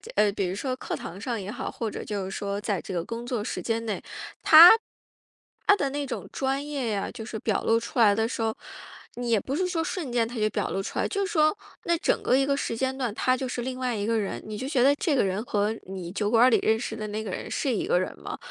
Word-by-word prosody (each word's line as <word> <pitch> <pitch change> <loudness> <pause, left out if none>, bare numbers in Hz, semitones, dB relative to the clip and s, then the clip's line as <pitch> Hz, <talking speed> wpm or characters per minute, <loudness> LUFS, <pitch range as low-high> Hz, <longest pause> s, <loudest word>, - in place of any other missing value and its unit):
呃， 205 -1 +4
比 195 -2 -1
如 180 - -3
说 255 +5 -2
课 - - -4
堂 185 +4 -8
上 235 -1 -2
也 195 +1 -5
好， 245 - -4
或 225 -2 -4
者 - - -6
就 205 -3 -3
是 190 - -6
说 200 0 -3
在 205 -4 -2
这 - - -8
个 175 -2 -2
工 230 +2 -5
作 240 -3 -2
时 - - -4
间 230 0 -2
内， 215 - -3 0.4
他 330 +3 +11 1.0
他 405 - +7
的 280 -9 -1
那 290 +1 -2
种 255 - -5
专 270 +1 -1
业 275 -5 -2
呀， 200 -2 -2
就 230 - -8
是 220 0 -6
表 215 -1 -1
露 225 0 +3
出 235 +2 -5
来 210 -3 +6
的 225 +1 +1
时 235 - -4
候， 220 0 0 0.6
你 245 0 -4
也 225 -2 +4
不 265 +7 -4
是 365 +3 0
说 340 -3 -1
瞬 325 -5 -4
间 235 -2 +1
他 240 - -8
就 215 -1 +2
表 205 - -1
露 195 - -2
出 - - -6
来， - - +1
就 400 -1 -1
是 385 - -5
说 310 +1 +3 0.3
那 340 - +2
整 - - +1
个 - - +3
一 270 - +3
个 280 0 +1
时 275 - -2
间 265 +2 -1
段， 250 -5 -2
他 255 +2 +2
就 260 - -3
是 250 -1 -3
另 255 +1 -4
外 250 -2 -1
一 205 -1 -2
个 230 +1 +1
人， 200 - -3
你 215 0 -6
就 260 - -4
觉 270 -5 +2
得 280 +2 +6
这 295 0 0
个 - - +3
人 195 +2 -1
和 210 -2 0 0.2
你 185 -2 -6
酒 205 +2 -1
馆 235 +1 +6
儿 - - +6
里 235 - +4
认 220 0 +2
识 225 - -4
的 215 -1 -5
那 215 +1 -4
个 215 - -6
人 - - -5
是 275 - -1
一 - - -1
个 180 - +3
人 185 - -4
吗？ - - -6
230 Hz, 310 characters per minute, -26 LUFS, 205-265 Hz, 1.0 s, 他